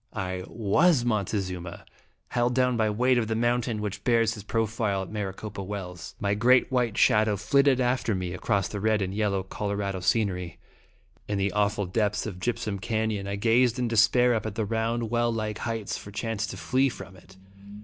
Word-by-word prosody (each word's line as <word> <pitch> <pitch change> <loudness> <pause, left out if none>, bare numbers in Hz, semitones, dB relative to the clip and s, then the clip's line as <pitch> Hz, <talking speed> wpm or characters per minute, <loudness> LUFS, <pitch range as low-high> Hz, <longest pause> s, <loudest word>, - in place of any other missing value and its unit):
I 95 -1 -3
was 120 - +2
Montezuma, 95 -5 -2 0.4
held 120 0 +1
down 125 -1 +2
by 110 -2 +2
weight 125 +4 +2
of 110 - -1
the 110 - -1
mountain 120 -1 0
which 100 -1 -4
bears 115 -2 +3
his 105 - -8
profile 110 -2 -1
at 95 - -10
Maricopa 105 0 -5
Wells. 95 -3 -7
My 100 -1 0
great 125 +5 +4
white 120 -4 0
shadow 105 -1 +4
flitted 135 +6 +3
after 125 -3 +1
me 90 -1 -3
across 100 +1 0
the 105 - -5
red 110 -1 +2
and 95 0 -3
yellow 100 -2 0
of 95 - -14
Colorado 100 -2 -2
scenery. 90 -3 0 0.7
In 105 - -1
the 100 0 0
aw 105 0 +3
ful 105 -1 -3
depths 105 +2 0
of 95 -5 -6
Gypsum 105 -1 -2
Canon, 110 -2 -2
I 100 - -2
gazed 120 +4 +3
in 125 -1 0
de 115 - -2
spair 120 +3 +5
up 110 -1 -2
at 105 - -6
the 110 - -1
round, 115 +1 -1
well 120 0 +2
like 110 -2 -3
heights 115 -3 -3
for - - -10
chance 110 +1 -3
to - - -7
flee 135 +1 +1
from 95 -5 -10
It. 95 +1 -18
105 Hz, 195 wpm, -27 LUFS, 100-115 Hz, 0.7 s, spair